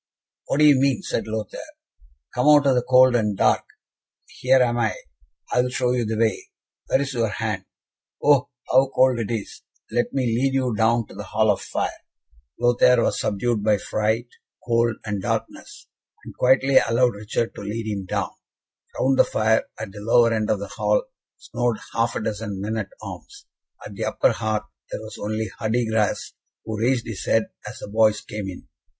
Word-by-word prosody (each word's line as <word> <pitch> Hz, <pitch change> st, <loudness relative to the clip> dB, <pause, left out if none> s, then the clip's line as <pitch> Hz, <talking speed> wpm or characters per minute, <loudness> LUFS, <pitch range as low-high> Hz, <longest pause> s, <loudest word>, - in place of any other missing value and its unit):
"What -, -, 0 dB
do 150 Hz, -, +5 dB
you 145 Hz, -3 st, +6 dB
mean?" 140 Hz, +7 st, +1 dB
said 115 Hz, -, -2 dB
Lothaire. 110 Hz, -2 st, -4 dB, 0.7 s
"Come 125 Hz, +4 st, +1 dB
out 150 Hz, -1 st, +7 dB
of 135 Hz, -, +4 dB
the 125 Hz, -, +2 dB
cold 125 Hz, 0 st, +5 dB
and 105 Hz, -4 st, 0 dB
dark. -, -, +3 dB, 0.6 s
Here 130 Hz, +1 st, +2 dB
am 120 Hz, -1 st, +2 dB
I. 110 Hz, -2 st, +1 dB, 0.6 s
I 125 Hz, -, +4 dB
will 125 Hz, -, -1 dB
show 125 Hz, 0 st, 0 dB
you 125 Hz, -2 st, 0 dB
the 110 Hz, 0 st, -2 dB
way. 110 Hz, -3 st, 0 dB, 0.4 s
Where 135 Hz, -, +2 dB
is 140 Hz, 0 st, -3 dB
your 115 Hz, -2 st, +1 dB
hand? 105 Hz, -3 st, -3 dB, 0.5 s
Oh, 145 Hz, -1 st, +3 dB, 0.2 s
how 130 Hz, +1 st, +5 dB
cold 130 Hz, -2 st, +4 dB
it 110 Hz, -, -3 dB
is. 115 Hz, -4 st, -5 dB, 0.3 s
Let 120 Hz, -, 0 dB
me 135 Hz, -2 st, 0 dB
lead 125 Hz, +4 st, +1 dB
you 130 Hz, -3 st, +1 dB
down 115 Hz, +1 st, +2 dB
to -, -, -15 dB
the -, -, -7 dB
hall -, -, +2 dB
fire." -, -, -3 dB, 0.7 s
Lothaire 120 Hz, 0 st, +4 dB
was -, -, 0 dB
subdued 105 Hz, +1 st, -1 dB
by 105 Hz, -1 st, +3 dB
fright, 110 Hz, +3 st, -1 dB, 0.4 s
cold, 115 Hz, -1 st, +2 dB
and 105 Hz, -2 st, -3 dB
darkness, -, -, -4 dB, 0.4 s
and -, -, -10 dB
quietly 130 Hz, +1 st, +4 dB
allowed 120 Hz, +1 st, +2 dB
Richard 105 Hz, +3 st, -3 dB
to -, -, -9 dB
lead 105 Hz, +3 st, -4 dB
him 100 Hz, -3 st, -3 dB
down. -, -, -2 dB, 0.7 s
Round 135 Hz, 0 st, +2 dB
the -, -, +9 dB
fire, 110 Hz, +1 st, +1 dB
at 110 Hz, -3 st, -6 dB
the 105 Hz, -, -10 dB
lower 115 Hz, +1 st, +4 dB
end 110 Hz, -1 st, -1 dB
of 105 Hz, -, +2 dB
the 100 Hz, +1 st, -6 dB
hall, -, -, 0 dB, 0.3 s
snored 120 Hz, -2 st, -2 dB, 0.2 s
half 115 Hz, +1 st, 0 dB
a -, -, -2 dB
dozen 105 Hz, -2 st, -4 dB
men 105 Hz, +3 st, -3 dB
at 105 Hz, -3 st, -3 dB
arms; -, -, -10 dB, 0.4 s
at -, -, -8 dB
the -, -, -3 dB
upper -, -, +2 dB
hearth 110 Hz, 0 st, -2 dB, 0.3 s
there -, -, -4 dB
was 110 Hz, 0 st, -9 dB
only 110 Hz, 0 st, -3 dB
Hardigras, 110 Hz, -2 st, 0 dB, 0.3 s
who 110 Hz, -1 st, -4 dB
raised 120 Hz, 0 st, +1 dB
his 110 Hz, -4 st, -6 dB
head 110 Hz, -1 st, +2 dB, 0.2 s
as -, -, -10 dB
the -, -, -8 dB
boys 110 Hz, 0 st, +3 dB
came 105 Hz, -2 st, -6 dB
in. 90 Hz, -, -10 dB
115 Hz, 185 wpm, -23 LUFS, 110-125 Hz, 0.7 s, the